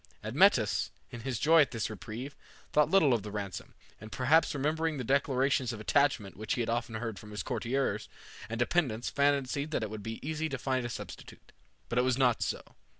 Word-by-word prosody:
Admetus, - - +3 0.2
in 120 - -7
his 125 +1 -3
joy 160 +6 +6
at 145 - +3
this 115 -3 -2
reprieve, 115 +6 -7 0.4
thought 150 -1 +4
little 160 -9 +5
of 115 - +1
the 105 - -7
ransom, 100 -3 -6 0.2
and 110 +1 -10
perhaps 145 +5 +3
remembering 155 +2 0
the 130 - -3
declarations 135 -1 +1
of 115 - -6
attachment 120 -3 +1
which 110 +1 -2
he 120 - -1
had 115 - -1
often 115 -1 -2
heard 110 -2 -4
from 105 - -12
his 105 0 -4
courtiers 125 +3 -1 0.4
and 115 - -3
dependents 120 -3 0
fancied 140 0 +1
that 155 - -1
it 105 - -4
would 110 -1 -6
be 115 +2 -5
easy 160 0 -2
to 135 - -3
find 130 -1 -1
a - - -7
substitute. - - -9 0.4
But 125 - 0
it - - +4
was 130 -1 +1
not 125 -4 +3
so. - - -2
125 Hz, 205 wpm, -31 LUFS, 110-140 Hz, 0.4 s, joy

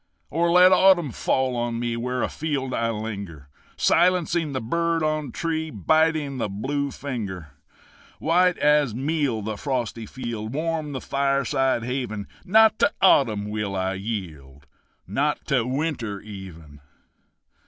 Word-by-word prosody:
Or 170 +2 +1
let 180 +1 +7
autumn 185 -6 +5
fall 130 +2 0
on 120 -1 -2
me 120 -1 -2
Where 125 +2 -2
afield 140 -4 -2
I 115 0 0
linger, 100 -10 -6 0.3
Silencing 175 -3 +2
the 130 - -2
bird 165 +7 0
on 155 -3 -1
tree, 160 +1 -2
Biting 155 - +1
the 110 - -1
blue 140 +8 -2
finger. 100 - -6 0.7
White 180 +2 +2
as 150 -6 +3
meal 135 -4 -1
the 110 0 -4
frosty 120 -4 -3
field 120 -2 -5
Warm 155 -1 -2
the 130 - -4
fireside 140 -3 0
haven 120 -5 -3 0.2
Not 220 +2 +5
to - - +4
autumn 110 - +4
will 105 -2 -3
I 95 0 -1
yield, 80 -10 -6 0.4
Not 140 +10 -1
to 125 -5 +2
winter 130 -7 -2
even! 90 -8 -11
130 Hz, 130 wpm, -24 LUFS, 105-155 Hz, 0.7 s, let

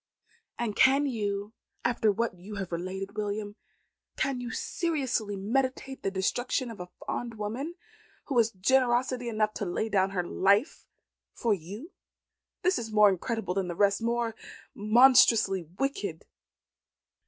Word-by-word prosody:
"And 230 -4 -2
can 275 +2 +5
you, 205 -4 -2 0.3
after 235 -3 +2
what 230 +2 -1
you 185 +4 -10
have 195 -3 -5
related, 190 +4 -4
William, 205 0 -3 0.6
can 265 -2 -1
you 245 - -5
seriously 260 - -1
meditate 260 +6 -2
the - - 0
destruction 235 +6 -1
of 225 - -10
a 180 0 -7 0.2
fond 235 -1 -4
woman, 240 +11 -4 0.5
who 275 - -3
has 225 -1 +4
generosity 245 +3 +1
enough 215 -1 0
to 205 - -3
lay 195 +5 -2
down 195 -2 +2
her 185 -2 -1
life 200 - +1 0.5
for 230 -3 +1
you? 205 - -7 0.7
This 365 +1 +2
is 225 -2 -6
more 210 -1 +6
incredible 195 0 -2
than 190 -1 -1
the 175 - -4
rest 200 +2 +2
more 235 0 0 0.4
monstrously 220 -3 +5 0.2
wicked." 275 +7 -2
215 Hz, 140 wpm, -28 LUFS, 200-245 Hz, 0.7 s, more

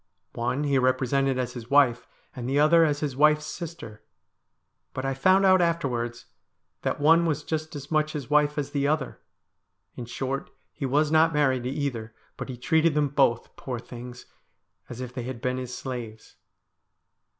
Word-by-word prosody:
One 120 +5 -1
he 140 -2 +2
represented 130 +1 +1
as 125 -1 -2
his 120 -2 -9
wife, 125 -4 +3 0.3
and 125 -1 -5
the 140 +2 +2
other 165 +3 +6
as 145 -1 -1
his 145 -4 -2
wife's 150 +2 +4
sister. 155 -10 -8 0.9
But 130 - -3
I 135 - 0
found 185 +8 +4
out 185 -1 +6
afterwards 130 -9 -1 0.6
that - - -2
one 165 +3 +5
was 150 -2 -1
just 155 +1 -4
as 140 +1 -8
much 155 0 +1
his 145 -5 -5
wife 150 0 +2
as 145 -1 -2
the 140 -1 0
other. 150 -2 -1 0.8
In 120 - -6
short, 135 +3 -4 0.2
he 140 -3 -3
was 150 +3 +2
not 160 +1 +4
married 130 -4 +2
to - - -1
either, 125 -6 -4 0.2
but - - -7
he 125 - -6
treated 160 +5 +2
them 150 -1 +2
both, 135 -4 +1
poor 125 -2 -5
things, 125 +1 -10 0.6
as 120 +1 -7
if 125 -1 -6
they 125 - -4
had 130 -2 -5
been 125 +2 -2
his 125 -1 -6
slaves.' 120 -4 -7
140 Hz, 175 wpm, -26 LUFS, 125-150 Hz, 0.9 s, other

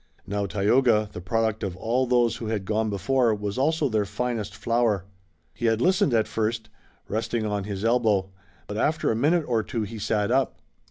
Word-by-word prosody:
Now, 100 0 -2
Tayoga, 105 +2 +2
the 90 - -6
product 110 +4 0
of 95 -3 -4
all 120 +6 0
those 120 -1 +2
who 115 - -5
had 105 -3 -2
gone 110 +2 0
before, 115 +3 +1
was 105 +3 -4
also 155 +2 +2
their 110 -4 +1
finest 105 0 -3
flower. 110 -4 +1 0.5
He 120 - -1
had 110 -1 +2
listened 180 0 +3
at 110 - +2
first, 110 0 -2 0.4
resting 110 +1 -2
on 105 -2 -2
his 100 0 -4
elbow, 110 -5 +2 0.3
but 105 - -6
after 155 +6 +1
a - - 0
minute 155 +7 +2
or 115 -3 +1
two 115 +1 -3
he 110 +2 -6
sat 105 +1 0
up. 135 +1 +1
110 Hz, 185 wpm, -25 LUFS, 105-120 Hz, 0.5 s, listened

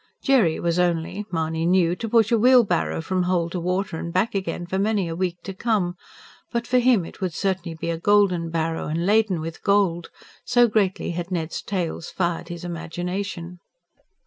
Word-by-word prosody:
Jerry 235 - +3
was 170 0 0
only, 175 +4 0
Mahony 160 -1 -1
knew, 175 -1 +3
to 225 - -4
push 225 0 +3
a 230 - +5
wheelbarrow 235 -9 +3
from 185 +3 -1
hole 175 -2 0
to 180 - -3
water 180 -1 -2
and 170 - -5
back 185 +6 +1
again 190 -3 -3
for 190 +2 -2
many 205 -2 +1
a 165 - -4
week 180 0 -1
to 195 - -6
come; 190 -4 0 0.6
but 235 0 -1
for 250 +1 +3
him 240 -7 +3
it - - -12
would 180 -4 -2
certainly 185 -4 -2
be 170 - -2
a 165 - -3
golden 185 -4 +3
barrow, 165 0 -2
and 165 +3 -1
laden 205 -4 +2
with 165 0 -6
gold, 195 -4 +1 0.3
so 245 -1 +4
greatly 200 -5 0
had 175 +1 -4
Ned's 170 -3 -3
tales 175 -4 -3
fired 170 -2 -2
his 175 0 -7
imagination. 175 +1 -5
180 Hz, 185 wpm, -23 LUFS, 170-200 Hz, 0.6 s, a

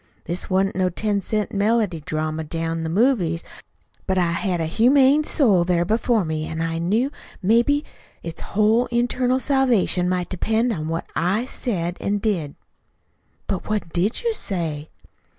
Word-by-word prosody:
This 175 +2 -3
wa'n't 190 +1 +1
no 185 0 +1
ten 205 +3 -1
cent 210 +2 -1
melodydrama 165 -8 0
down 165 0 -2
to 165 - -3
the - - -2
movies, 180 -5 +1 0.6
but 190 -1 +1
I 175 -2 +2
had 175 +1 -1
a 165 - 0
humane 265 - +4
soul 215 - +3
there 175 -1 +1
before 220 0 +1
me, 155 -1 -3
an' 160 - -5
I 165 0 -1
knew 220 +11 +1 0.3
maybe 235 +9 +3 0.4
it's 165 -1 -6
whole 215 +4 +2
internal 245 +1 +1
salvation 250 -10 +2
might 180 -1 -1
depend 225 +5 0
on 155 -4 -4
what 165 +1 -3
I 195 +8 +1
said 180 -10 -3
an' 205 +1 0
did." 190 -9 -2 0.9
"But 190 +1 -4
what 205 -6 -2
DID 195 - 0
you 465 -1 +1
say?" 160 - -4
195 Hz, 155 wpm, -22 LUFS, 170-230 Hz, 0.9 s, humane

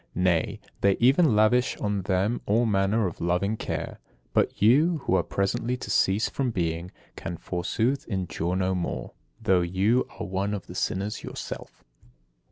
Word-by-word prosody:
Nay, 90 -2 +1 0.2
they 100 -1 +3
even 130 +1 +5
lavish 115 +4 +3
on 105 -1 -1
them 95 +5 0
all 115 +4 +3
manner 105 +1 +2
of 90 - -4
loving 90 +5 +1
care. - - -4 0.3
But - - +1
you, 150 +11 +4
who - - +1
are 95 - +4
presently 120 +5 -1
to 105 - -6
cease 100 +2 +3
from 135 -2 -1
being, 85 -4 -2 0.3
can, 85 0 -5
forsooth, 110 +11 -1
endure 90 -3 -2
no 95 0 +1
more, 90 -2 -3 0.3
though 95 -2 +3
you 95 +8 +1
are - - -3
one 95 +2 -1
of 100 - -6
the - - -10
sinners 100 +2 -2
yourself! - - -7
100 Hz, 160 wpm, -26 LUFS, 90-115 Hz, 0.3 s, even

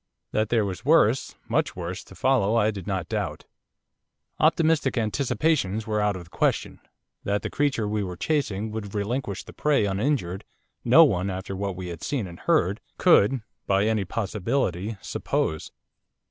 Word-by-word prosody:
That 110 0 0
there 115 -3 +2
was 95 -1 -5
worse 135 -5 +3
much 150 +7 0
worse, 90 0 -5
to 95 - -14
follow 115 -1 +2
I 110 -1 +3
did 95 -4 -8
not 95 -4 -2
doubt. - - -3 0.9
Optimistic 160 -4 +3
anticipations 115 -2 0
were 105 -1 0
out 105 -1 +1
of 90 - -7
the 85 - -19
question, - - 0 0.4
that 100 +1 -1
the - - -4
creature 140 -7 0
we 105 0 -1
were 90 -2 -5
chasing 110 - -1
would 105 -2 -6
relinquish 105 0 -2
the - - -12
prey 145 -7 +2
uninjured, 95 -2 -1 0.4
no - - +8
one, 90 +2 +1
after 95 +1 -5
what 100 -1 -3
we 90 -1 -6
had 85 -2 -7
seen 135 -7 -2
and 85 -2 -10
heard, - - +1 0.2
could 115 +4 +4 0.2
by 100 +1 +3
any 110 -2 +1
possibility 100 0 -2
suppose. 80 - -2
105 Hz, 160 wpm, -25 LUFS, 95-125 Hz, 0.9 s, no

